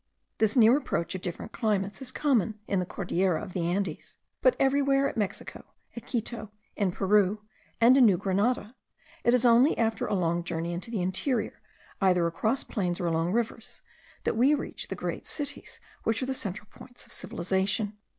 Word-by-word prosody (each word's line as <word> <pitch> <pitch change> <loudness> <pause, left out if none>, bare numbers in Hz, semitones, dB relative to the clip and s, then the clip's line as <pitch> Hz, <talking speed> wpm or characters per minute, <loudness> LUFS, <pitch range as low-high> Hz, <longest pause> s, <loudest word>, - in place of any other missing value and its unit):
This 220 -1 +3
near 235 +3 +7
approach 170 - -2
of 185 - -5
different 175 - -5
climates 205 0 -1
is 260 - -4
common 235 -7 +1
in 195 - +1
the 180 - -2
Cordillera 180 -2 0
of 190 -4 -8
the 170 -2 -1
Andes; 180 -2 -3 0.2
but - - +4
everywhere, 275 0 +3
at - - -5
Mexico, 205 -4 -4 0.3
at 235 - -9
Quito, 230 -2 -3 0.3
in 200 -4 +1
Peru, 205 +2 +2 0.4
and 235 +3 +7
in 260 -3 +7
New 190 -4 +4
Granada, 205 +5 0 0.5
it 240 - +4
is 250 0 +2
only 245 +5 +5
after 225 -2 0
a - - 0
long 170 -2 0
journey 170 0 -3
into 180 +7 -5
the 215 -6 -2
interior, 220 +7 -1 0.4
either 180 -3 +3
across 215 +10 0
plains 180 -5 -2
or 175 - -2
along 165 +1 0
rivers, 230 +1 -3 0.4
that - - 0
we 260 +6 +4
reach 290 - -4
the - - -4
great - - -5
cities, 290 -2 -4 0.2
which 225 +3 0
are - - 0
the 265 - -2
central 210 -4 -4
points 245 - -11
of - - -15
civilization. 195 +4 -1
210 Hz, 180 wpm, -28 LUFS, 185-245 Hz, 0.5 s, near